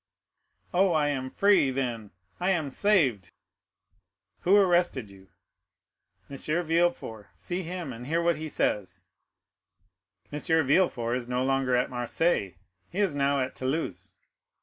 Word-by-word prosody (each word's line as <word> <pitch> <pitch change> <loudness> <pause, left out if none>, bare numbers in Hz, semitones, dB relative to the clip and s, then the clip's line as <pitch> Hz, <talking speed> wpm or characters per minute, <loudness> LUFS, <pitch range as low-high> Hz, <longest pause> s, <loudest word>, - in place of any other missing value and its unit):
"Oh, 185 0 +3
I 150 -2 +2
am 130 -2 -2
free—then 130 - +1 0.3
I 180 - 0
am 160 -7 0
saved!" 130 - +2 1.1
"Who 190 +3 +4
arrested 175 - +2
you?" 95 -1 -17 1.0
"M. 140 - -8 0.3
Villefort. 165 -11 0
See 180 +1 -4
him, 175 -5 -5
and 120 +2 -9
hear 165 +3 +1
what 170 -2 +1
he 155 0 -5
says." 105 -8 -2 1.2
"M. 150 - -4 0.3
Villefort 130 -6 +2
is 120 -2 -6
no 125 +1 0
longer 135 -1 +1
at 125 +2 0
Marseilles; 120 - 0 0.3
he 180 - -9
is 200 -6 +2
now 140 -1 +1
at 130 0 -3
Toulouse." 100 - -3
140 Hz, 125 wpm, -27 LUFS, 125-175 Hz, 1.2 s, Who